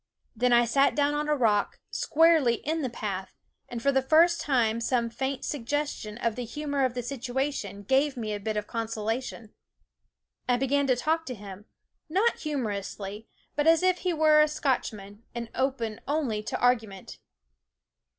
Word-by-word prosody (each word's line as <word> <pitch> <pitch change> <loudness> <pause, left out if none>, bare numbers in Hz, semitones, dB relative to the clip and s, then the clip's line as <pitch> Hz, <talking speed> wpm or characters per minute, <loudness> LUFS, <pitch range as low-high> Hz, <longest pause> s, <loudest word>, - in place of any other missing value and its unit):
Then 250 +2 +2
I 240 0 +6
sat 275 +4 +3
down 290 0 +2
on 300 0 -1
a 300 - +3
rock, 215 -6 +1
squarely 315 -6 +4
in 315 +6 -2
the 260 - -1
path, 195 -5 -5 0.3
and 235 -1 -6
for 280 - +4
the 265 -1 +2
first 330 +5 +4
time 235 -5 +1
some 235 -1 0
faint 265 +2 -3
suggestion 285 -5 -3
of 230 -2 -1
the 250 - -4
humor 285 +3 -1
of 250 -1 -2
the 245 - -3
situation 245 -4 -3
gave 270 +5 +2
me 215 -3 -3
a 205 - -3
bit 215 +1 -3
of 210 - -2
consolation. 225 0 -4 1.0
I 245 - +4
began 275 +2 +1
to 255 - +4
talk 320 +6 0
to 250 - -4
him, 200 -1 -10 0.4
not 400 +8 +2
humorously, 210 -6 -4 0.3
but 295 +1 +1
as 330 +2 +5
if 370 -1 +3
he 365 - 0
were 310 -2 +5
a 305 - +5
Scotchman 220 -8 -2
and 235 -1 -5
open 240 -5 -2
only 275 -8 0
to - - -3
argu 245 -3 +3
ment. 195 -2 -11
250 Hz, 170 wpm, -27 LUFS, 220-295 Hz, 1.0 s, I